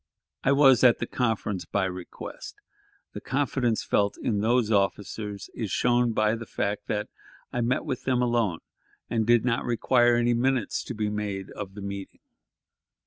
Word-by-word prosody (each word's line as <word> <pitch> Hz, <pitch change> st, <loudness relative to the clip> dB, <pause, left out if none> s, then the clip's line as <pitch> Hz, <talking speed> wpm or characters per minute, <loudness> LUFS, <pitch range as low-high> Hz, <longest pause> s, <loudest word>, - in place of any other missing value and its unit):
I 135 Hz, -, +3 dB
was 135 Hz, -3 st, +6 dB
at 125 Hz, -2 st, +7 dB
the -, -, -3 dB
conference 110 Hz, -7 st, -1 dB
by 100 Hz, +3 st, 0 dB
request; 90 Hz, -1 st, -7 dB, 0.6 s
the -, -, -7 dB
confidence 130 Hz, -4 st, 0 dB
felt 100 Hz, 0 st, +1 dB
in 105 Hz, -3 st, -1 dB
those 115 Hz, +1 st, +2 dB
officers 100 Hz, 0 st, -1 dB
is 110 Hz, -4 st, -4 dB
shown 120 Hz, +1 st, +2 dB
by 110 Hz, -1 st, +2 dB
the 115 Hz, -1 st, -5 dB
fact 100 Hz, +1 st, -3 dB
that 105 Hz, 0 st, -2 dB, 0.5 s
I 120 Hz, -, 0 dB
met 120 Hz, +2 st, 0 dB, 0.2 s
them 130 Hz, -2 st, +1 dB
alone, 115 Hz, -8 st, 0 dB, 0.5 s
and 110 Hz, -2 st, 0 dB
did 120 Hz, -1 st, +4 dB
not 120 Hz, -2 st, +1 dB
require 120 Hz, +1 st, +3 dB
any 120 Hz, 0 st, +2 dB
minutes 125 Hz, -2 st, 0 dB
to 125 Hz, -, -5 dB
be 105 Hz, -1 st, -1 dB
made 100 Hz, -2 st, -4 dB
of 100 Hz, -2 st, -7 dB
the 105 Hz, -, -7 dB
meeting. 100 Hz, -1 st, -7 dB
115 Hz, 160 wpm, -26 LUFS, 105-120 Hz, 0.6 s, at